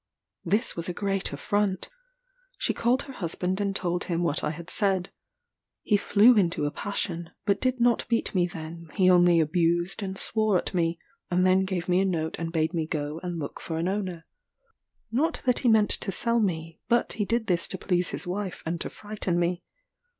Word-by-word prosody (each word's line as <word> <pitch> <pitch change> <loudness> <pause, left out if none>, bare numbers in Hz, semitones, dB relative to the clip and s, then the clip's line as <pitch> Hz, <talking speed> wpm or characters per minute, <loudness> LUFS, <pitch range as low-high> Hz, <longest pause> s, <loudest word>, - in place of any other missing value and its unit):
This 210 +8 0
was 170 +1 -1
a 175 - -4
great 195 -1 -1
affront. 195 - -1 0.7
She - - +1
called 250 +4 +1
her 270 - -9
husband 185 0 -1
and 200 -1 -1
told 175 -2 -1
him 175 -1 -1
what 160 -3 0
I - - +1
had 165 +2 -7
said. 195 -3 +1 0.7
He 210 - +3
flew 210 +4 +5
into 170 -7 +2
a 145 - -1
passion: 175 -4 -3 0.2
but 200 -1 +1
did 255 -1 +1
not 235 -1 +2
beat 230 -1 0
me 180 -2 +2
then; 165 -1 -8
he 185 -2 +5
only 175 -1 +5
abused 170 +4 +1
and 190 -1 -4
swore 215 -3 +2
at - - -3
me; 170 -2 +1 0.3
and 180 +1 +2
then 185 +1 +4
gave 185 -2 -3
me 180 0 +3
a 195 - +2
note 160 -4 -1
and 165 -1 -3
bade 160 +1 0
me 160 -2 -1
go 150 0 -3
and 175 -2 -4
look 145 -3 -5
for 160 - -4
an 165 +2 -1
owner. 185 -4 -3 0.9
Not 310 +8 0
that 250 -1 +3
he 245 - +2
meant 220 -2 +4
to 195 - 0
sell 235 +4 +1
me; 165 -5 -2
but 235 0 +2
he 210 - -1
did 230 +1 0
this 175 -4 +1
to 190 - -5
please 180 -1 +1
his - - -1
wife 190 +1 -4
and 165 +1 -3
to - - -2
frighten 205 -4 -3
me. 175 +1 0
185 Hz, 200 wpm, -27 LUFS, 170-205 Hz, 0.9 s, flew